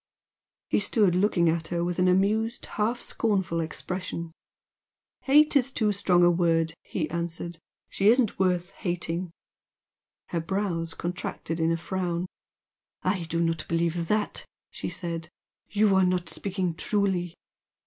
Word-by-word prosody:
He - - +4
stood 205 -2 +3
looking 180 -2 +3
at 160 0 +1
her 170 -1 -1
with 175 +1 -2
an 180 - +4
amused, 210 +5 +2
half 230 +3 -1
scornful 190 -7 0
expression. 170 +1 -4 0.9
"Hate 300 +3 +5
is 270 -1 +4
too 215 -5 +1
strong 185 -3 +3
a 175 - +6
word" 165 -2 +2
he 160 -4 -3
answered 170 0 -4 0.3
"She 195 - 0
isn't 235 -3 +4
worth 180 -1 +1
hating!" 175 -2 -3 1.0
Her 170 - -1
brows 170 -3 -2
contracted 170 -1 -4
in 165 0 +2
a 165 - +1
frown. 175 0 -2 0.8
"I 180 -4 0
do 165 +1 -1
not 165 -2 0
believe 170 0 0
THAT!" 210 +2 0 0.3
she - - -4
said 165 -2 -4 0.4
"You 210 -1 +3
are 190 - +5
not 180 -1 +1
speaking 190 -3 -2
truly. 180 -1 0
180 Hz, 140 wpm, -27 LUFS, 170-200 Hz, 1.0 s, a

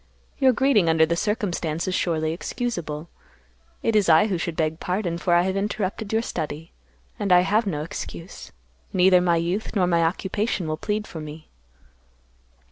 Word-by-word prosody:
Your 265 -2 +5
greeting 245 -8 +3
under 160 0 +5
the 170 +1 0
circumstance 175 -6 -2
is 185 - -1
surely 160 -3 0
excusable. 170 -6 -4 0.8
It 225 - +1
is 205 -4 +3
I 160 +5 +6
who 190 -5 -1
should 170 -1 -3
beg 160 0 -1
pardon, 180 -2 -2
for 175 0 +2
I 175 - +4
have 190 +1 -1
interrupted 200 0 -2
your 225 +1 +1
study, 155 -4 -5 0.5
and 200 - -1
I 180 0 +7
have 210 +4 +1
no 150 -5 -2
excuse; 165 +2 -8 0.4
neither 180 0 +5
my 175 -1 +3
youth 175 +7 -2
nor 190 -3 +3
my 170 -1 +2
occupation 190 +2 -1
will 155 - -1
plead 210 +5 -2
for 165 - -8
me." 155 +1 -9
180 Hz, 170 wpm, -24 LUFS, 165-205 Hz, 0.8 s, I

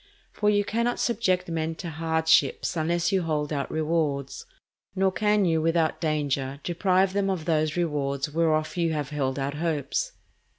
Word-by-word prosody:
For 210 - +1
you 205 -1 +2
cannot 235 +3 0
subject 185 -6 +1
men 165 -1 -2
to 170 0 -6
hardships 160 -1 +2
unless 170 +2 0
you 190 -1 +2
hold 150 -2 -1
out 140 -1 -2
rewards, 155 -4 -1 0.5
nor 190 0 +2
can 210 +1 +2
you 165 -2 +2
without 165 0 +1
danger 140 -3 -1
deprive 185 +2 +2
them 200 -1 +1
of 180 -5 -2
those 155 -1 +1
rewards 140 -5 -1
whereof 155 -1 +1
you 165 -2 +1
have 150 -2 -3
held 135 -3 -1
out 140 +1 -2
hopes. 150 -3 -2
160 Hz, 160 wpm, -26 LUFS, 150-180 Hz, 0.5 s, you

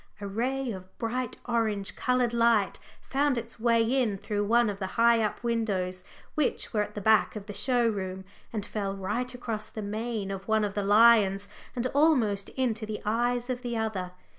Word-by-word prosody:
A 205 - -6
ray 250 +5 -1
of 185 -2 -10
bright 245 +1 -2
orange 220 -5 -1
coloured 250 -2 +1
light 230 -4 +3 0.2
found 280 -1 +1
its 230 0 -5
way 230 0 +3
in 235 -3 +1
through 205 +1 -2
one 235 +2 +4
of 200 -1 -3
the 190 - -2
high 230 0 +5
up 215 +2 -2
windows 195 -6 -1 0.3
which 300 -4 -1
were 210 - +2
at 210 0 -4
the 205 - -4
back 220 +2 +4
of 210 -2 -6
the 205 - -7
show 240 +3 +2
room, 190 -3 -3 0.3
and 210 -3 -3
fell 200 -2 -3
right 210 +6 -2
across 225 -3 -4
the 215 - -6
mane 215 -1 -3
of 195 0 -6
one 220 -1 +2
of 205 -1 -1
the 205 - -1
lions 205 -2 +5 0.3
and 245 0 -2
almost 255 -10 +3
into 235 -4 0
the 215 0 -4
eyes 240 +3 +1
of 250 -1 -3
the 240 -2 -3
other. 195 -5 -2
220 Hz, 190 wpm, -28 LUFS, 200-240 Hz, 0.3 s, high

